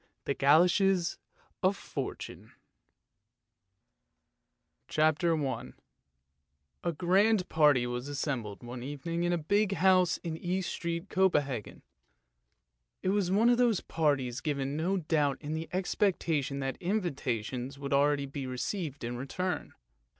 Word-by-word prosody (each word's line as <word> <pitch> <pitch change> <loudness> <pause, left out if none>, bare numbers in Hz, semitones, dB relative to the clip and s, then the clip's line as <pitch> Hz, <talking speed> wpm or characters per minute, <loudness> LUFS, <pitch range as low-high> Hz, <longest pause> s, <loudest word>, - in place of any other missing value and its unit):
THE 140 - 0
GOLOSHES 175 +6 +3 0.4
OF 195 +1 +2
FORTUNE - - -6 2.3
CHAPTER 155 +2 +2
I 125 -1 -5 1.1
A 170 - +1
GRAND 185 +4 +3
party 150 -6 +4
was 125 +2 -4
assembled 130 -7 -3
one 120 +1 -7
evening 145 +6 -4
in 175 - +1
a 175 - +2
big 200 +5 +1
house 185 -2 +4
in 160 -2 -3
East 180 +2 -2
Street, 170 +2 -3
Copenhagen. 145 - 0 1.2
It 185 - +1
was 195 -2 +1
one 215 +5 +4
of 240 - +2
those 235 -5 +3
parties 135 -6 0
given, 140 -2 -2
no 175 +5 0
doubt, 150 -5 +1
in 150 0 -5
the 160 +1 -4
expectation 175 -6 0
that 135 0 -3
invitations 135 - -2
would 140 0 +1
be 140 -2 -4
received 145 +3 -4
in 120 +1 -3
return. 180 +8 -3
155 Hz, 120 wpm, -30 LUFS, 135-185 Hz, 2.3 s, party